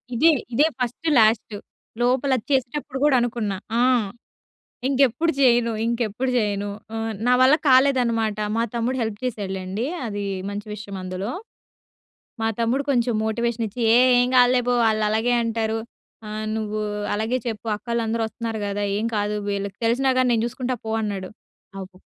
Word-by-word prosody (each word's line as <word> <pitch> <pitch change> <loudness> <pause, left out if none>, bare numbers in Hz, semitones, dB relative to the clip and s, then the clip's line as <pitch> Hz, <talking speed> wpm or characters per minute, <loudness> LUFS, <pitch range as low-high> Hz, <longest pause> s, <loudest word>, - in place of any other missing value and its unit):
ఇదే, 320 +8 +5 0.2
ఇదే 285 +6 +4
first, 250 +6 -2
last. 220 -1 +3 0.4
లోపల 260 +3 +2 0.2
చేసేటప్పుడు 270 +1 -1
కూడా 295 -3 +4
అనుకున్నా. 225 -5 -2 0.2
ఆ! - - +4 1.1
ఇంకెప్పుడు 275 +4 +2
చేయను 240 -3 +4
ఇంకెప్పుడు 235 +1 -1
చేయను 205 -2 -1 0.2
ఆ! - - -3 0.3
నా 250 - +4
వల్ల 260 +3 +6
కాలేదనమాట. 245 -5 +3 0.2
మా 230 - +2
తమ్ముడు 240 +2 -1
హెల్ప్ 220 -2 -3
చేశాడులెండి. 195 -2 -3 0.2
అది 205 -2 -4 0.3
మంచి 205 +1 -6
విషయం 205 -1 -8
అందులో. 185 +4 -4 1.1
మా - - +1
తమ్ముడు 240 +4 +1
కొంచెం 240 -3 +1
మోటివేషన్ 235 +1 -1
ఇచ్చి 225 +5 -8 0.2
"ఏ - - +7 0.2
ఏం 245 - +2
కాదులే! 250 0 +5
పో - - +3 0.2
ఆళ్ళు 215 0 +1
అలాగే 225 +3 +1
అంటారు 225 -1 -1 0.5
ఆ! - - -7 0.3
నువ్వు 215 -1 -3 0.3
అలాగే 220 +4 0
చెప్పు 225 -1 -4
అక్కోలందరు 230 0 -2
ఒస్తున్నారు 225 0 -5
గదా! 205 0 -2
ఏం 215 +2 -1
కాదు 210 0 -1
వీళ్ళకి 200 0 -3
తెలిసినా 260 +3 +2
గాని 255 -1 +3
నేను 225 -1 +1
చూసుకుంటా 250 +1 -3
పో" 220 - -2
అన్నాడు. 195 -3 -4 0.4
ఆ - - -10
ఒక్క 185 0 -22
230 Hz, 150 wpm, -23 LUFS, 210-250 Hz, 1.1 s, ఏ